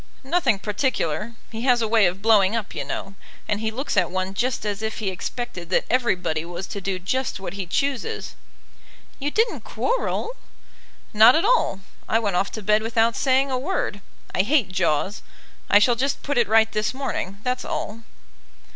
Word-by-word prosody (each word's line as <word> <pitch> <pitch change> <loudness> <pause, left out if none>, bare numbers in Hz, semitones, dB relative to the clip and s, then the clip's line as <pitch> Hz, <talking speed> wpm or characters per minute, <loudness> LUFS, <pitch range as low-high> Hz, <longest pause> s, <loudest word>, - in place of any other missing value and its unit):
"Nothing 270 - +2
particular. 210 - -1 0.2
He 225 0 -5
has 250 -1 +4
a 225 - 0
way 220 -3 +5
of 185 +3 -4
blowing 215 -2 +5
up, 225 -3 -3
you - - -3
know; 195 - -5 0.3
and 210 - 0
he 220 0 -1
looks 255 +6 -3
at 185 -4 +3
one 185 +1 -2
just 245 +2 -1
as 205 0 -2
if 220 0 -3
he 210 -4 -1
expected 185 -2 -5
that - - +2
everybody 180 -11 +1
was 175 +2 -6
to 200 - -5
do 195 0 -2
just 240 +8 -2
what 195 - -6
he 195 -2 -5
chooses." 270 +5 -2 0.9
"You 285 +1 -1
didn't 450 +9 +1
quarrel?" - - -2 0.8
"Not 220 +4 +8
at 330 +5 +2
all; 455 - +2 0.3
I 225 - +4
went 205 -5 -1
off 195 +3 +1
to 215 - -6
bed 210 +2 +3
without 225 +1 +2
saying 270 0 +2
a 255 - 0
word. 270 - -2 0.3
I - - +3
hate 225 -2 +2
jaws. 185 +1 0 0.5
I 205 - +7
shall 225 +4 +5
just 270 +4 -1
put 285 -3 0
it 235 - +3
right 220 +1 +4
this 215 +3 -1
morning; 200 -8 -3
that's 250 0 -1
all." 220 +2 -4
220 Hz, 185 wpm, -23 LUFS, 195-255 Hz, 0.9 s, Not